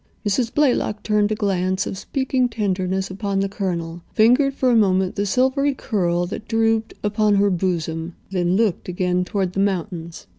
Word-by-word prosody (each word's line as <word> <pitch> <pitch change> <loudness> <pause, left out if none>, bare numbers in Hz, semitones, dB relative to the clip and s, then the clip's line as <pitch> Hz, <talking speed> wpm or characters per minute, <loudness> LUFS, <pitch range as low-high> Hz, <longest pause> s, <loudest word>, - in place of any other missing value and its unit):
Mrs. 225 +4 0
Blaylock 255 -7 +1
turned 210 -1 +1
a - - +1
glance 190 -2 0
of - - -4
speaking 260 +4 -1
tenderness 190 -3 -1
upon 200 0 -2
the 195 - +1
Colonel, 175 -4 -4
fingered 255 +5 +4
for 255 -2 +2
a - - +4
moment 190 -4 +2
the 205 0 -1
silvery 265 +6 +2
curl 175 -7 0
that 205 +4 -7
drooped 225 -1 +1
upon 210 0 +2
her 200 0 +3
bosom, 165 -2 -2 0.2
then 180 -1 +1
looked 205 -4 0
again 180 0 0
toward 185 -1 -2
the 195 - -2
mountains. 175 -4 -2
200 Hz, 170 wpm, -21 LUFS, 180-225 Hz, 0.2 s, fingered